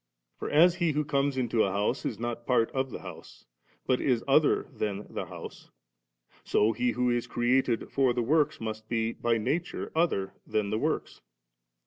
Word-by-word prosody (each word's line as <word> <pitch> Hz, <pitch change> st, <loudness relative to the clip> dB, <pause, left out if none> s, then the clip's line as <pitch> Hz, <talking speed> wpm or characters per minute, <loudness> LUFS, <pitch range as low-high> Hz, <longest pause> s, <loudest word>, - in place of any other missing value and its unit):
For -, -, -4 dB
as 170 Hz, +4 st, +6 dB
he 170 Hz, -3 st, +1 dB
who 150 Hz, +1 st, 0 dB
comes 140 Hz, -1 st, 0 dB
into 120 Hz, -3 st, +2 dB
a 95 Hz, -, 0 dB
house, 100 Hz, +2 st, -1 dB
is -, -, -4 dB
not 120 Hz, 0 st, -4 dB
part 115 Hz, -3 st, +2 dB
of 130 Hz, 0 st, -1 dB
the -, -, -7 dB
house, -, -, -11 dB, 0.4 s
but 130 Hz, -, +1 dB
is 125 Hz, -4 st, +1 dB
other 145 Hz, +2 st, +4 dB
than 105 Hz, -3 st, -3 dB
the -, -, -3 dB
house, -, -, -10 dB, 0.7 s
so 105 Hz, +2 st, +2 dB
He 120 Hz, +2 st, 0 dB
who 125 Hz, 0 st, +1 dB
is 120 Hz, 0 st, -1 dB
created 120 Hz, -1 st, +1 dB
for 135 Hz, -2 st, +3 dB
the 120 Hz, 0 st, 0 dB
works, 150 Hz, +4 st, +2 dB
must 110 Hz, -1 st, -6 dB
be 115 Hz, -1 st, 0 dB
hj 115 Hz, -1 st, 0 dB
nature 165 Hz, +10 st, -2 dB
other 160 Hz, -, 0 dB
than 105 Hz, -2 st, -1 dB
the 110 Hz, -, 0 dB
works. -, -, -2 dB
120 Hz, 180 wpm, -28 LUFS, 110-140 Hz, 0.7 s, as